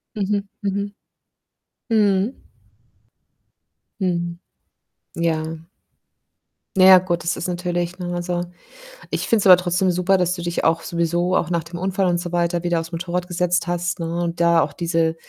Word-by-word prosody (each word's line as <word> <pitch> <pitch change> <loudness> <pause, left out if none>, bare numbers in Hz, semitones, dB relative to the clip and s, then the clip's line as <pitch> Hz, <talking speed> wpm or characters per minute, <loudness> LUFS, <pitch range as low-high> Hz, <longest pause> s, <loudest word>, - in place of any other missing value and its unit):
Mhm, 205 0 -1
mhm. 200 +1 -2 1.0
Mhm. 210 +1 +2 1.7
Mhm. 175 -2 -1 0.8
Ja. 165 -1 0 1.4
Na 185 - +6
ja, 190 -1 +10
gut, 175 -2 -2
das 170 0 0
ist 180 - -4
natürlich, 175 0 -2
ne, 175 -1 -4
also 175 0 -2 0.7
ich - - -2
finde 225 -2 +3
es 200 - -2
aber 180 -1 +9
trotzdem 180 +1 +1
super, 180 +2 +2
dass 180 0 +1
du 175 - -7
dich 175 0 -2
auch 165 0 +3
sowieso 175 +2 0
auch - - 0
nach 170 -2 0
dem 170 +2 -8
Unfall 190 +1 0
und 175 -1 +2
so 175 0 -5
weiter 175 0 0
wieder 170 -1 +1
auf's 165 +1 -8
Motorrad 180 +1 -3
gesetzt 175 0 0
hast, 175 0 -2
ne, 170 +1 -2
und 170 0 -3
da 170 -1 +4
auch - - -2
diese 165 -2 0
175 Hz, 160 wpm, -21 LUFS, 170-185 Hz, 1.7 s, ja